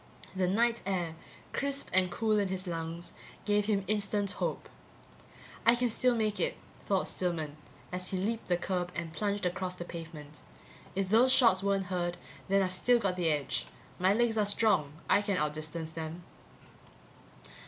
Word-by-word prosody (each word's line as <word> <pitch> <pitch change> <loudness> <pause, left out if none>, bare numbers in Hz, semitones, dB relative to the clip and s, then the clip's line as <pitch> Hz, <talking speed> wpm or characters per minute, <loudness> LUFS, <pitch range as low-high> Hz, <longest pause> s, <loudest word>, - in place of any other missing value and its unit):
The 185 -1 +1
night 230 +5 +2
air, 180 -4 -1 0.4
crisp 280 0 -1
and 185 -1 +4
cool 215 +3 +1
in 200 - +1
his 185 0 -3
lungs, 165 0 -5 0.3
gave 205 -1 +2
him 205 -2 +1
instant 205 -1 0
hope. - - -3 1.0
I 235 - +6
can 245 -1 +1
still 250 +2 +2
make 215 -2 0
it, - - 0 0.3
thought 195 -2 +1
Stillman, 160 -5 -2 0.4
as 180 0 -3
he 190 - -2
leaped 220 +5 -2
the 175 - +2
curb 180 0 -2
and 165 -1 -4
plunged 205 +1 -1
across 180 +1 -2
the 175 - -6
pavement. 160 -3 -9 0.5
If 195 -1 0
those 235 +5 +6
shots 230 -8 +6
weren't 195 -1 +1
heard, 175 -1 -1 0.3
then 195 0 +3
I've 185 -1 0
still 245 +6 +4
got 195 -5 0
the 175 -3 +1
edge. 145 -2 -1 0.3
My 185 +2 +4
legs 225 +1 +2
are 210 - +3
strong; 205 -9 +3
I 205 - +4
can 205 -2 -1
outdistance 155 +1 -2
them. 160 +2 -6
190 Hz, 165 wpm, -31 LUFS, 175-210 Hz, 1.0 s, I